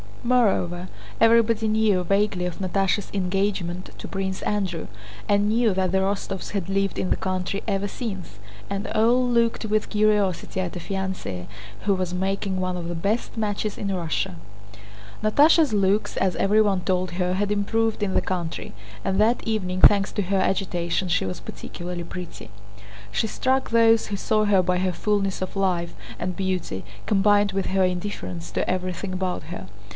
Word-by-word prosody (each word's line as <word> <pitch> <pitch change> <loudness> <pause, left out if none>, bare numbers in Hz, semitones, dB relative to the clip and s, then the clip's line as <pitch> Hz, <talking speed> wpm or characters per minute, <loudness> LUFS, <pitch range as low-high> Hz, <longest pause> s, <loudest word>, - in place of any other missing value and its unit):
Moreover, 195 -8 +2 0.3
everybody 225 -1 +4
knew 215 -4 +2
vaguely 195 -1 +1
of 180 +1 -4
Natásha's 195 +1 0
engagement 185 -2 -1
to - - -6
Prince 190 -1 -3
Andrew, 190 -6 -1 0.4
and 205 0 +3
knew 225 -1 +3
that 185 -1 +1
the 190 - +2
Rostóvs 195 0 -2
had 195 -3 -3
lived 195 0 0
in 185 - -1
the - - +3
country 185 +1 -2
ever 200 -1 0
since, 195 - -6 0.3
and 200 +2 -3
all 240 +3 +3
looked 235 -2 +1
with 215 0 0
curiosity 210 -4 +1
at 185 -1 -3
a - - -3
fiancée 190 - -4 0.4
who 200 -1 +2
was 185 -1 -2
making 190 +1 -1
one 185 0 -1
of 170 -1 -4
the 175 - -3
best 200 +8 -1
matches 210 -1 -2
in 200 -1 -1
Russia. 165 - -2 0.9
Natásha's 290 +4 +5
looks, 200 +1 +1
as 185 -2 +1
everyone 205 -2 +3
told 185 -1 0
her, 180 0 0
had 205 +2 0
improved 220 +2 0
in 190 -2 0
the - - +3
country, 175 - -4 0.3
and 190 +1 0
that 225 +3 +3
evening 185 -4 -1
thanks 200 -1 +6
to 205 - -1
her 195 +2 0
agitation 185 -2 0
she 170 - +1
was 95 - -4
particularly 175 0 -6
pretty. 180 +1 -8 0.6
She 220 - 0
struck 260 +4 0
those 230 -1 +4
who 205 - -3
saw 215 +2 +1
her 200 -2 +4
by 180 0 +1
her 185 0 0
fullness 200 -1 0
of 185 - -4
life 180 -3 0 0.2
and 180 0 -2
beauty, 185 - -2 0.2
combined 205 0 +4
with 195 0 -1
her 190 0 +2
indifference 175 - -3
to - - -1
everything 185 +1 -2
about 185 -1 -2
her. 165 - -7
195 Hz, 165 wpm, -24 LUFS, 180-210 Hz, 0.9 s, thanks